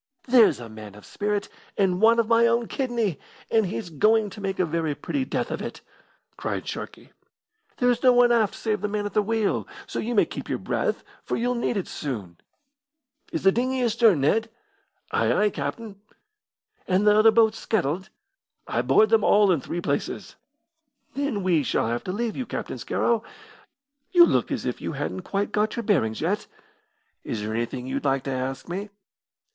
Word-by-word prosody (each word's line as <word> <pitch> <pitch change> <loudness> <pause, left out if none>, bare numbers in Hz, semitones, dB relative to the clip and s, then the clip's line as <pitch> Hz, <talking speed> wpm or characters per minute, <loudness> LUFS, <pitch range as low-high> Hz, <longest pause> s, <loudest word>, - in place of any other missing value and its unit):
"There's 240 - +5
a 120 - -8
man 110 -2 -11
of 105 - -14
spirit, 205 -1 -2 0.3
and 190 -2 +1
one 230 +1 +6
of 230 -2 +2
my 230 +1 +5
own 235 0 +1
kidney, 235 - -1 0.3
and 220 -3 +3
he's 165 +2 -5
going 215 +6 +3
to 210 - -10
make 195 -1 -2
a 185 - +2
very 160 -2 -1
pretty 270 - -3
death - - -2
of - - -3
it!" - - -6 0.6
cried - - -4
Sharkey. - - -7 0.7
"There's 245 -1 +2
no 255 - +6
one 245 0 +5
aft 225 -4 +2
save 215 -3 -2
the 210 - 0
man 205 0 -2
at 205 - -4
the 210 - +3
wheel, 220 0 0 0.2
so - - -5
you 235 +2 -2
may - - +5
keep - - -8
your - - 0
breath, - - -2 0.2
for - - -2
you'll 245 +2 0
need 240 -2 -1
it 190 - -3
soon. 105 - -5 0.9
Is - - -3
the 195 - +6
dinghy 255 +3 0
astern, 225 - +3
Ned?" 225 +11 +2 0.6
"Ay, - - +2
ay, 210 0 +3
captain!" 215 -4 -5 0.9
"And 190 +2 +2
the 210 0 +6
other 215 +1 +7
boats 220 0 +3
scuttled?" 185 -3 -1 0.6
"I - - -1
bored 215 - +4
them 225 -1 +4
all 205 -2 +5
in 165 -6 +1
three 175 - -4
places." - - -3 0.8
"Then 275 -8 -2
we 175 -4 +3
shall 135 - 0
have 120 +1 -2
to 185 - -2
leave 225 +3 -2
you, 255 - -4
Captain - - -5
Scarrow. 230 -2 0 0.9
You 350 -2 +8
look - - 0
as - - -2
if - - -3
you - - -4
hadn't 185 - -4
quite 200 +3 -2
got 210 0 0
your 235 - -3
bearings 135 - +1
yet. 190 +6 -1 0.8
Is 110 - -4
there 105 +1 -3
anything 120 +2 -3
you'd 135 +2 -3
like 135 -2 +1
to 135 - -3
ask 130 +1 -4
me?" 195 +4 -4
210 Hz, 190 wpm, -25 LUFS, 165-230 Hz, 0.9 s, You